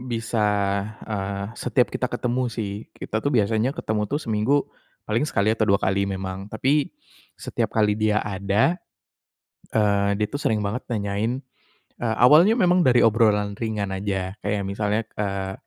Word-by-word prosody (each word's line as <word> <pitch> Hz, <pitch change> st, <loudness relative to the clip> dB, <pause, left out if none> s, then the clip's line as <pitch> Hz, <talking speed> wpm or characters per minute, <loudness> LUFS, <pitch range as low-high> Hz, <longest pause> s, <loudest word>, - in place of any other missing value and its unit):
bisa, 115 Hz, 0 st, -2 dB, 0.6 s
eee, 100 Hz, -2 st, -3 dB
setiap 125 Hz, 0 st, +1 dB
kita 125 Hz, -, -1 dB
ketemu 125 Hz, +1 st, -1 dB
sih. 105 Hz, -3 st, -5 dB
Kita 110 Hz, -, -3 dB
tuh 140 Hz, -, -2 dB
biasanya 110 Hz, +4 st, +1 dB
ketemu 105 Hz, -1 st, -2 dB
tuh 145 Hz, -, -2 dB
seminggu 115 Hz, +6 st, +1 dB, 0.4 s
paling 115 Hz, +8 st, 0 dB
sekali 110 Hz, -3 st, +1 dB
atau 110 Hz, -1 st, 0 dB
2 100 Hz, -, +5 dB
kali 100 Hz, +1 st, +1 dB
memang. 95 Hz, 0 st, -5 dB
Tapi 135 Hz, +7 st, +1 dB, 0.5 s
setiap -, -, -3 dB
kali 105 Hz, -1 st, +2 dB
dia 105 Hz, 0 st, +2 dB
ada, 100 Hz, -, +1 dB, 0.9 s
eee, 100 Hz, -2 st, +2 dB
dia 105 Hz, +1 st, 0 dB
tuh 145 Hz, -, -3 dB
sering 110 Hz, -8 st, 0 dB
banget 110 Hz, +6 st, -2 dB
nanyain 110 Hz, +4 st, -2 dB, 0.6 s
eee, 110 Hz, -2 st, -1 dB
awalnya 170 Hz, -, +7 dB
memang 180 Hz, -4 st, +4 dB
dari 125 Hz, -6 st, +4 dB
obrolan 105 Hz, -2 st, +3 dB
ringan 105 Hz, -2 st, -3 dB
aja. 95 Hz, -1 st, -2 dB
Kayak 100 Hz, 0 st, -1 dB
misalnya, 105 Hz, +2 st, -1 dB
eee 100 Hz, -2 st, -3 dB
105 Hz, 150 wpm, -24 LUFS, 100-120 Hz, 0.9 s, awalnya